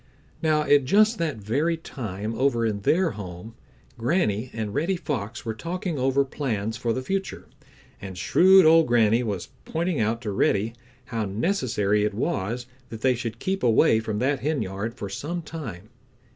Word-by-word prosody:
Now 155 -1 +2
at 145 -2 +4
just 215 - +4
that 160 -7 -1
very 140 +11 0
time 110 - -5
over 120 -1 +1
in 105 -2 -1
their 170 - +2
home, 95 +2 -8 0.5
Granny 120 - 0
and 110 -2 -4
Reddy 165 +8 0
Fox 130 - -4
were 115 - -2
talking 170 - -4
over 135 +2 +2
plans 115 -6 -3
for 120 -1 -1
the 130 +3 -2
future, 195 +6 -3 0.6
and 95 -2 -7
shrewd 190 - +6
old 165 +1 +6
Granny 115 -1 +4
was 100 -7 -3
pointing 170 -1 -1
out 110 +1 +1
to 105 - -2
Reddy 100 +3 +1 0.3
how 115 -3 -2
necessary 105 - 0
it 105 -1 -1
was 115 +2 -2 0.2
that 110 -1 -8
they 130 -1 +4
should 115 -2 -4
keep 190 +1 -2
away 115 -1 +4
from 110 -2 -3
that 135 +4 +1
henyard 115 -7 -2
for 100 - -5
some 150 - -4
time. 115 - -8
120 Hz, 165 wpm, -25 LUFS, 105-155 Hz, 0.6 s, shrewd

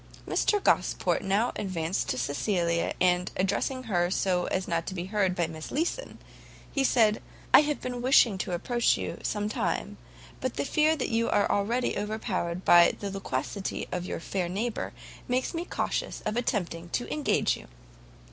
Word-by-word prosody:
Mr 415 - +2
Gosport - - +2
now 205 +5 +1
advanced 180 -2 -2
to 125 - 0
Cecilia, 170 - 0
and 180 0 +2
addressing 200 +7 0
her 175 -6 +1
so 180 -1 +1
as 185 0 -2
not 170 -1 -1
to 190 - -4
be 175 0 -3
heard 190 -2 +1
by 175 - +1
Miss 160 -1 -7
Leeson, 345 - -2 0.7
said, 225 -5 +3 0.3
"I - - +10
have 295 -1 -2
been 245 -1 -4
wishing 240 -6 +5
to 185 - -2
approach 240 +7 +2
you, - - -4
some 210 0 -1
time, 210 - -2 0.4
but - - -3
the 140 - -1
fear 310 - +3
that 280 - -2
you 230 0 +1
are 205 - +3
already 225 +3 0
overpowered 195 -4 -3
by 175 0 +7
the 200 -1 -4
loquacity 195 0 -3
of 180 0 -3
your - - -3
fair 180 +1 -2
neighbour 215 +5 -2 0.4
makes 255 +5 0
me 335 +1 -3
cautious - - -2
of 215 - -1
attempting 175 -8 -2
to 245 - -2
engage 300 -2 +1
you." - - -12
200 Hz, 165 wpm, -28 LUFS, 175-240 Hz, 0.7 s, I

